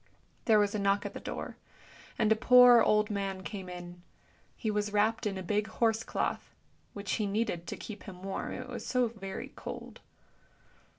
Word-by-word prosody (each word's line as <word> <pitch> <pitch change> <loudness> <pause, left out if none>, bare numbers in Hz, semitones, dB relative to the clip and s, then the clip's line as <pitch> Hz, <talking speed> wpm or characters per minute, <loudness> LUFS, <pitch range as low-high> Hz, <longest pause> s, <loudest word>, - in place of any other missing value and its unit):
There 220 -2 +5
was 205 -1 +2
a 215 - -1
knock 200 0 +1
at - - -4
the - - -6
door, - - -6 0.6
and 220 -1 +2
a - - +7
poor 245 0 +8
old 210 0 +3
man 195 -2 -3
came 185 +2 -6
in; 175 0 -9 0.6
he 220 - -1
was 210 0 -1
wrapped 215 +2 +2
in 195 -2 -3
a 190 - -5
big 210 +3 0
horse 225 0 +1
cloth, - - -3 0.4
which 200 -1 -5
he 215 -3 0
needed 200 -5 -1
to - - -5
keep 215 -2 -8
him 185 -2 -10
warm, 195 0 -4
it 255 - -6
was 245 -1 -6
so 250 -2 +1
very 195 -4 -7
cold. - - -8
210 Hz, 185 wpm, -31 LUFS, 195-225 Hz, 0.6 s, poor